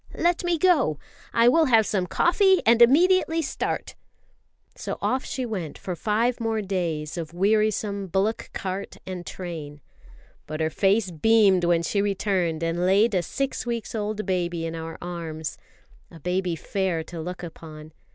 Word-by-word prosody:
"Let 345 +1 +1
me 350 -1 +1
go! 300 - +3 0.3
I 230 0 +4
will 320 +6 +5
have 225 -5 +4
some 190 -4 -1
coffee, 380 - +3
and 230 +1 +5
immediately 330 +5 +5
start!" 275 - -3 0.8
So - - -5
off 260 +1 0
she 260 - -3
went 185 -10 -5
for 180 - -5
five 225 +7 0
more 225 -1 -1
days 170 -5 -2
of 165 0 -7
wearisome 205 0 +1
bullock 195 +5 -1
cart 190 +1 -5
and 185 -2 -6
train. 160 -5 -7 0.7
But 155 0 -5
her 160 0 0
face 195 +2 +2
beamed 195 +1 +4
when 170 -1 +2
she 200 +5 0
returned 190 -5 0
and 165 +1 -1
laid 200 +5 +4
a 185 - +2
six 270 +7 -3
weeks 235 0 -3
old 215 -1 -3
baby 175 -3 -1
in 165 - -4
our 165 0 -6
arms 165 -3 -5 0.5
a 165 - -13
baby 180 +1 -1
fair 180 -1 -2
to 165 0 -8
look 180 +2 -6
upon. 155 -2 -10
190 Hz, 160 wpm, -25 LUFS, 170-225 Hz, 0.8 s, will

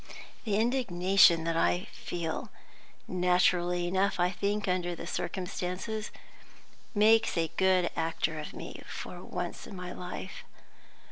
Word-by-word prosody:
The 210 -3 +1
indignation 195 -8 +4
that 165 0 -1
I 175 +3 +2
feel 165 -2 -4 0.6
naturally 180 -1 +2
enough, 190 +1 +1
I 175 +1 +3
think, 200 +2 -1
under 180 -1 0
the 170 - -7
circumstances 185 +4 -3 0.9
makes 220 -1 +5
a 165 -1 0
good 185 -2 +3
actor 160 -1 -1
of 150 - -6
me - - -8
for - - -7
once - - -5
in 200 - -9
my 180 -1 -6
life. 180 +1 -7
180 Hz, 125 wpm, -30 LUFS, 175-200 Hz, 0.9 s, makes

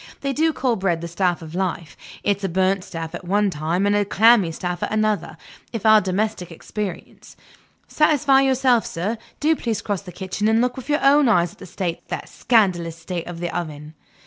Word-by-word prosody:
They 275 0 -1
do 320 +3 +2
call 255 -5 0
bread 175 -4 0
the 170 - -4
staff 175 -1 -1
of 160 0 -10
life. 180 -3 -3 0.3
It's 200 -1 0
a 195 - 0
burnt 190 +2 +1
staff 165 -4 -6
at - - -7
one 200 +2 +1
time, 165 +5 -1
and 205 0 +2
a 205 - +3
clammy 210 -3 +4
staff 175 +2 -4
at - - -2
another, 215 -1 0 0.3
in 230 - -3
our 215 -1 +7
domestic 185 -1 -2
experience. 190 +3 -7 0.5
Satisfy 290 -3 +3
yourself, 260 -3 +3
sir; 205 +7 -3 0.2
do 315 +2 +3
please 230 -7 -3
cross 205 -3 -2
the 190 -2 -10
kitchen 190 +3 -3
and 220 +1 +3
look 250 +1 +1
with 260 +2 -9
your 295 +1 +1
own 280 -1 +5
eyes 175 -6 +3
at - - -20
the 190 - -10
state, 175 -1 -4
the - - -4
scandalous 180 -8 +1
state, 170 +1 -5
of 175 -1 -7
the 175 0 -4
oven." 155 -3 -5
195 Hz, 200 wpm, -22 LUFS, 175-230 Hz, 0.5 s, our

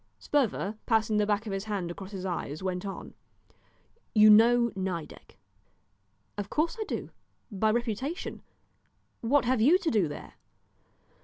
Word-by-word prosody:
Sperver, 220 -6 -1
passing 220 -2 +2
the 210 -1 +2
back 210 +1 0
of 205 - -4
his 195 +1 -3
hand 195 -5 -3
across 190 +2 -8
his 190 -2 -6
eyes, 170 -3 -4
went 185 +1 -3
on 195 - -7 1.0
"You 215 0 +8
know 235 +2 +5
Nideck?" 185 -4 -5 1.0
"Of 200 0 -4
course 320 +8 0
I - - -2
do - - -5 0.4
by 215 +2 +1
reputation; 240 - -2 0.8
what 250 +2 +2
have 250 -2 +2
you 300 +10 +6
to 370 -4 -1
do 205 -7 +2
there?" 145 - -9
215 Hz, 145 wpm, -28 LUFS, 195-240 Hz, 1.0 s, You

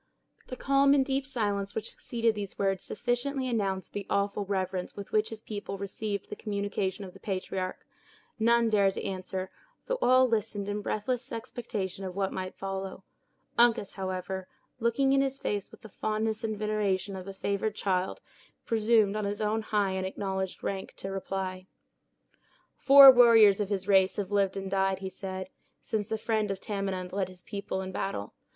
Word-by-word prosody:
The 255 - -5
calm 275 +1 +4
and 270 -2 +3
deep 270 0 -1
silence 205 -6 -1
which 220 0 -3
succeeded 230 -1 0
these 205 -2 -5
words 195 -2 0
sufficiently 255 +4 -1
announced 195 -6 -1
the 200 -1 -4
awful 200 0 0
reverence 190 -2 -2
with 200 -1 -8
which 215 0 +2
his 220 0 -9
people 205 -2 -5
received 200 +1 -4
the - - -3
communication 200 -1 -2
of 185 - -10
the - - -14
patriarch. 185 -1 -4 0.5
None 235 +1 +4
dared 200 -2 +3
to - - -4
answer, 185 -1 -4 0.3
though - - -1
all 255 +1 +6
listened 210 -3 -1
in 205 0 -2
breathless 240 +5 -2
expectation 210 -5 -4
of 185 -1 -5
what 195 -1 -1
might 185 0 -4
follow. 195 0 -5 0.6
Uncas, 235 -4 +4
however, 185 -1 -4 0.3
looking 250 +4 +2
in 275 - +4
his 270 0 0
face 205 -2 -2
with - - -16
the 220 - -10
fondness 215 +2 -2
and 215 -1 -2
veneration 205 -2 -1
of 185 0 -7
a - - -4
favored 200 +2 -1
child, 185 -2 -1 0.4
presumed 220 -2 +3
on 215 -1 -1
his 205 +1 -2
own 215 +1 0
high 210 -3 0
and 190 0 -2
acknowledged 190 -1 -3
rank, 195 -1 -4
to 195 - -6
reply. 190 -1 -4 1.1
"Four 275 0 +10
warriors 230 -5 +7
of 205 -2 -1
his 195 -2 -2
race 190 -1 +4
have 205 -1 -3
lived 200 -1 +2
and 195 -1 -4
died," 195 -1 +2
he 190 0 -5
said, 190 0 -6 0.3
"since 210 -2 -2
the 220 -1 -1
friend 215 -1 0
of 195 -1 -3
Tamenund 195 -3 -3
led 190 -2 -1
his 185 -1 -12
people 200 -2 -4
in 190 0 -5
battle. 185 - -3
200 Hz, 175 wpm, -29 LUFS, 190-220 Hz, 1.1 s, Four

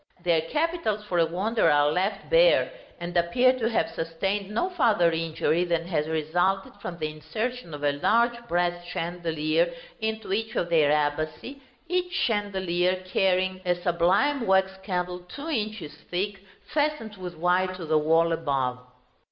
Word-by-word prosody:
Their 170 -2 +3
capitals, 295 - -1
for 180 -4 -1
a 165 - +4
wonder, 205 +7 +1
are 145 0 +4
left 190 +6 -1
bare, - - +5 0.3
and 175 +1 -6
appear 245 +10 +4
to 225 -1 +1
have 220 -1 +1
sustained 195 +2 -2
no 350 - -1
farther 220 - +3
injury 165 +1 0
than 170 -2 -1
has 155 -4 -1
resulted 175 +5 0
from 170 - -6
the 155 -2 -2
insertion 170 +8 -4
of 145 - -9
a 145 - +3
large 235 +11 +2
brass 175 -1 0
chandelier 170 -1 -1 0.3
into 220 -2 -2
each 225 +2 -2
of 170 - -1
their 155 -3 +4
abaci, 155 - -1 0.3
each 360 0 -1
chandelier 185 - 0
carrying 185 0 +1
a 180 -1 +1
sublime 180 +10 +1
wax 190 0 +4
candle 180 -2 -2
two 280 - -8
inches 215 - -3 0.2
thick, 195 +3 -2 0.3
fastened 290 -8 -1
with 180 -3 -7
wire 180 +2 +2
to 180 -2 -7
the 155 0 +3
wall 165 +2 +3
above. 135 -6 -1
180 Hz, 150 wpm, -26 LUFS, 165-215 Hz, 0.3 s, bare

